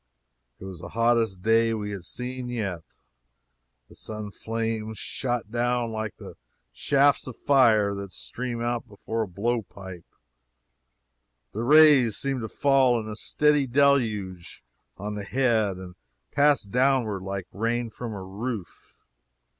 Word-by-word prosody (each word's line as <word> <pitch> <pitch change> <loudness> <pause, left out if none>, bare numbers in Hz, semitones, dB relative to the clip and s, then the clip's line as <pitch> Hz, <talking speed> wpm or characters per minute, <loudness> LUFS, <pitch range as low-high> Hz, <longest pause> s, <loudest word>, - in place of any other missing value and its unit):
It - - -10
was 95 -3 -8
the - - -8
hottest 115 -5 +1
day 115 +1 +3
we 105 -1 -4
had 100 -3 -6
seen 125 +2 -5
yet 100 -8 -3 1.1
the - - -17
sun 105 -1 -7
flames 110 0 -3
shot 120 -2 -3
down 120 0 0
like 110 -2 -4
the - - -11 0.4
shafts 140 0 +2
of 130 - -7
fire 110 -7 +4
that 100 -1 -6
stream 120 +2 -5
out 120 0 -2
before 110 +2 -4
a 110 - -1
blow 115 +6 -1
pipe 95 -3 -11 1.5
the 110 - -3
rays 145 -4 +6
seemed 135 -2 -2
to 110 - -5
fall 135 -4 +3
in 110 - -6
a 105 - -5
steady 150 +4 +2
deluge 115 - +1 0.3
on 105 +2 -5
the 105 -1 -5
head 110 -4 +1
and 90 -1 -9 0.4
pass 145 -1 +3
downward 120 -2 +1
like 95 -1 -4
rain 115 +3 -1
from 120 +1 -6
a 100 -3 -6
roof. 100 +1 -6
115 Hz, 140 wpm, -26 LUFS, 100-125 Hz, 1.5 s, rays